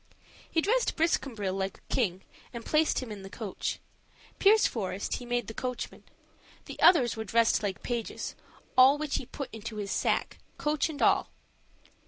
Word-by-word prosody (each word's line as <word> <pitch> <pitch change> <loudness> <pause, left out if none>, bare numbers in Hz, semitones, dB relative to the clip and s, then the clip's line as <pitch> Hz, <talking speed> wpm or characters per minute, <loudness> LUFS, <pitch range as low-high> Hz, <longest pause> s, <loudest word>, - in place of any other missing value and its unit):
He 325 - +2
dressed 470 +7 +1
Briscambril 245 - 0
like 195 0 -3
a - - -9
king 190 -6 0 0.3
and 235 -2 -7
placed 305 -3 +2
him 235 - -8
in 205 -2 -7
the 195 - -9
coach; 205 -1 -4 0.6
Pierceforest 225 - +2
he 245 - -9
made 245 -1 0
the 225 - -7
coachman; 250 +1 -5 0.6
the - - -9
others 270 -10 +6
were 220 - -4
dressed 225 +2 +3
like 200 -3 -3
pages; 235 -2 -3 0.4
all 265 +2 +7
which 300 -1 -1
he 250 - -6
put 275 +1 -7
into 225 0 -7
his 205 -2 -4
sack, - - 0 0.2
coach 300 +1 0
and 305 -2 -3
all. - - +3
240 Hz, 165 wpm, -29 LUFS, 210-295 Hz, 0.6 s, all